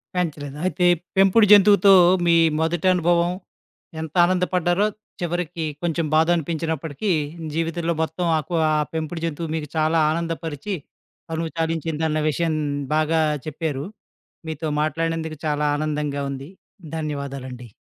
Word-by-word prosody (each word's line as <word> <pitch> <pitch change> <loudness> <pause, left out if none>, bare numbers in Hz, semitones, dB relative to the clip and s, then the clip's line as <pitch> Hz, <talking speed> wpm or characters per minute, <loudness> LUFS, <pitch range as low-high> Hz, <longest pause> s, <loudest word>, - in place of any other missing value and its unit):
పెంచలేదు. 150 -5 -3
అయితే 185 -1 +1 0.3
పెంపుడు 195 +3 +6
జంతువుతో 200 -1 +7 0.3
మీ 170 -1 +5 0.3
మొదటి 165 +2 0
అనుభవం 175 0 +2 0.7
ఎంత 160 -1 -7
ఆనందపడ్డారో, 180 +1 +1 0.3
చివరికి 175 -1 -2 0.2
కొంచెం 165 -1 0
బాధనిపించినప్పటికీ, 160 +1 0 0.4
జీవితంలో 165 +1 -1
మొత్తం 175 +2 -2
ఆ - - +1
కవా 160 -3 +2 0.2
పెంపుడు 160 +1 -4
జంతువు 165 0 -4
మీకు 150 -2 -4
చాలా 160 +1 +2
ఆనందపరిచి, 165 +2 -3 0.6
తనువు 165 0 -3
తాలించిందన్న 160 -1 -1
విషయం 165 +2 0 0.4
బాగా 155 +1 +2 0.3
చెప్పారు. 155 -2 -3 0.6
మీతో 160 0 -4
మాట్లాడినందుకు 160 +1 -2
చాలా 150 0 0
ఆనందంగా 150 -2 -2
ఉంది. 135 +2 -7 0.5
ధన్యవాదాలండి. 140 -5 -5
160 Hz, 110 wpm, -22 LUFS, 155-175 Hz, 0.7 s, జంతువుతో